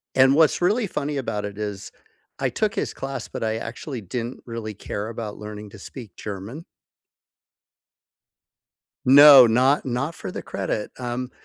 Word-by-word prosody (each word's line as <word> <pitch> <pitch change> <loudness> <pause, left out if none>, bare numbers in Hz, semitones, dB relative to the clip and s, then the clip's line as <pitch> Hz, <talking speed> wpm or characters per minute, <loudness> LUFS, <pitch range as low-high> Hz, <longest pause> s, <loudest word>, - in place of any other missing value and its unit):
and 130 +1 +5
what's 160 +2 +4
really 210 +5 +2
funny 150 -4 -3
about 105 -6 -3
it 100 0 -7
is 105 -2 -5 0.5
I 135 -1 0
took 215 - -1
his - - -2
class, 135 0 -5
but - - -6
I 110 0 -1
actually 120 +3 -6
didn't 115 +6 -5
really 115 -2 -6
care 105 +1 -5
about 115 -2 -6
learning 105 0 -8
to 105 - -12
speak 110 -1 -10
German. 105 - -7 2.4
No 140 -1 +10
not 130 +5 +3
not 135 +6 -2
for - - -7
the - - -6
credit, 105 - -3
um, 125 0 -4
120 Hz, 150 wpm, -23 LUFS, 105-135 Hz, 2.4 s, No